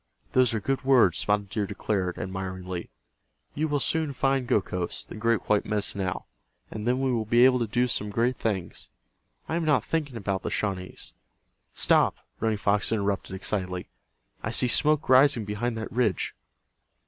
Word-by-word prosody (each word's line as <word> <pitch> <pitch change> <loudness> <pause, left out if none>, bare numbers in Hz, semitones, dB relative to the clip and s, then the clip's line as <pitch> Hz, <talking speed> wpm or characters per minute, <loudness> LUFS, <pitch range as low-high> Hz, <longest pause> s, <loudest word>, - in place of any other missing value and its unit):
"Those 130 -2 +4
are - - 0
good 135 +6 -2
words," 125 -10 +4
Spotted 105 -1 0
Deer 105 0 -2
declared, 95 -2 -2
admiringly. 95 -1 -5 0.6
"You 155 +2 -1
will 145 -1 0
soon 160 0 0
find 135 -1 0
Gokhos, 90 -5 -1
the - - -11
great 115 +1 0
white 105 -1 +3
Medicine 105 -1 -2
Owl, 90 -1 -3 0.4
and 110 +1 -5
then 125 +1 +2
we 135 -1 +1
will 115 -3 0
be 120 +3 +5
able 130 -1 +4
to 115 - -1
do 120 +4 +1
some 105 -3 -1
great 120 +5 +1
things. 95 -8 -4 0.6
I - - -3
am 170 0 0
not 145 -8 +3
thinking 145 -4 -2
about 100 -3 -2
the - - -3
Shawnees——" 95 -3 -4 0.6
"Stop!" - - +3 0.2
Running 110 -1 0
Fox 100 +1 +1
interrupted, 100 -3 -1
excitedly. 90 - -3 0.5
"I - - -3
see 125 - +3
smoke 150 +4 +2
rising 130 -3 +5
behind 110 +3 -2
that 110 - -5
ridge." 115 -7 0
110 Hz, 170 wpm, -27 LUFS, 100-130 Hz, 0.6 s, be